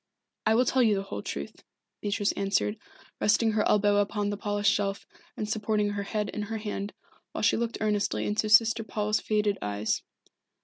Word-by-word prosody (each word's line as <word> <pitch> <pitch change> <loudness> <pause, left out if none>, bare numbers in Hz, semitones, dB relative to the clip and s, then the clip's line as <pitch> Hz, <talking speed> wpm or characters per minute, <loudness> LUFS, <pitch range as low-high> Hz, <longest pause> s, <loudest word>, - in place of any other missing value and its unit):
"I 220 - +4
will 250 +2 +4
tell 260 - +2
you 220 -4 +4
the 195 - -2
whole 100 - -6
truth," 70 -7 -6 0.4
Beatrice 205 0 0
answered, 200 +2 0 0.4
resting 220 +2 +3
her 215 0 +1
elbow 205 0 +3
upon 205 0 0
the - - -2
polished 205 0 +1
shelf 200 -1 -2 0.3
and 210 - -2
supporting 215 -1 0
her 205 0 -3
head 210 +1 -2
in 210 - -4
her 220 +2 -3
hand, 205 -1 -4 0.4
while - - -3
she - - +4
looked 230 0 -2
earnestly 210 -1 0
into 215 +1 0
Sister 225 +1 +5
Paul's 210 0 -1
faded 210 -1 0
eyes. 105 +1 -1
210 Hz, 180 wpm, -28 LUFS, 205-215 Hz, 0.4 s, Sister